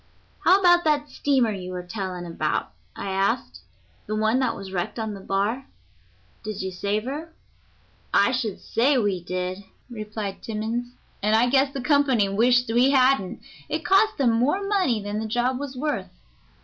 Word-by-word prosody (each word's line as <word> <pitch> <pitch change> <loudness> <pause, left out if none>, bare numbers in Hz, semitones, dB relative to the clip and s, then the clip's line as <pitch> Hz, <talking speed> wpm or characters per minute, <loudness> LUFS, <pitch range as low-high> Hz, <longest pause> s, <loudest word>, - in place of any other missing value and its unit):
"How 380 - +6
about 350 -2 +5
that 295 -1 +1
steamer 260 -6 +1
you 185 -3 -6
were 180 0 -5
telling 180 -2 -5
about," 160 -3 -2 0.2
I 195 - -4
asked; 195 +6 -1 0.5
"the 215 - -2
one 220 +3 +2
that 255 -3 0
was 195 -1 -8
wrecked 175 +4 -3
on 220 -2 -3
the 200 - -8
bar? 205 +7 -1 0.8
Did 210 -3 -4
you 190 - -3
save 200 +3 -2
her?" 300 +6 -5 0.8
"I 200 +5 +4
should 235 -6 -2
say 260 +5 +2
we 200 -6 0
did," 185 +2 -4 0.3
replied 210 -3 -5
Timmans, 230 +3 -4 0.3
"and 215 +2 +3
I 240 +2 +4
guess 270 0 +3
the 275 - -5
company 265 -6 +3
wished 245 +5 +3
we 245 +3 +5
hadn't; 260 -7 +2 0.3
it 310 -1 -3
cost 420 +5 +4
them 260 -4 +3
more 280 - +1
money 365 - +1
than 205 +1 -3
the 220 - -3
job 245 +3 0
was 275 -2 -6
worth. 295 +3 -2
230 Hz, 170 wpm, -24 LUFS, 200-270 Hz, 0.8 s, How